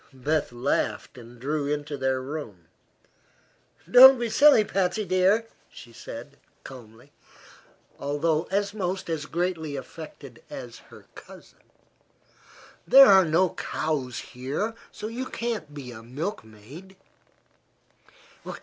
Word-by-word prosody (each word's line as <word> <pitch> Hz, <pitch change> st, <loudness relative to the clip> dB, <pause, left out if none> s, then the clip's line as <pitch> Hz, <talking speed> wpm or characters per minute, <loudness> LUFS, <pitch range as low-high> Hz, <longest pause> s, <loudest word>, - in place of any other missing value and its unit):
Beth 145 Hz, +3 st, -1 dB
laughed, 120 Hz, 0 st, -2 dB
and 120 Hz, -1 st, -14 dB
drew 145 Hz, +3 st, -2 dB
her 145 Hz, -, 0 dB
into 145 Hz, 0 st, -6 dB
their 130 Hz, -1 st, -1 dB
room. 130 Hz, -, -7 dB, 1.2 s
"Don't 260 Hz, +2 st, +9 dB
be 235 Hz, -2 st, -3 dB
silly, 285 Hz, -5 st, +6 dB
Patsy 195 Hz, +1 st, -1 dB
dear," 190 Hz, +5 st, +2 dB, 0.3 s
she 120 Hz, -, -14 dB
said, 120 Hz, +5 st, -10 dB, 0.3 s
calmly, 115 Hz, -4 st, -13 dB, 0.9 s
although 155 Hz, +3 st, -1 dB
almost 195 Hz, -3 st, -2 dB
as 150 Hz, -2 st, -3 dB
greatly 165 Hz, -4 st, -3 dB
affected 155 Hz, +3 st, -10 dB
as -, -, -9 dB
her -, -, -15 dB
cousin. -, -, -15 dB, 1.3 s
"There 275 Hz, +1 st, +9 dB
are 190 Hz, -5 st, +6 dB
no 170 Hz, +3 st, +2 dB
cows 135 Hz, -6 st, -3 dB, 0.2 s
here, 140 Hz, -, -3 dB, 0.2 s
so -, -, -9 dB
you 245 Hz, +3 st, -5 dB
can't 225 Hz, -10 st, -4 dB
be 140 Hz, -4 st, -9 dB
a 110 Hz, -2 st, -10 dB
milkmaid." 140 Hz, -, -8 dB
155 Hz, 115 wpm, -25 LUFS, 130-195 Hz, 1.3 s, Don't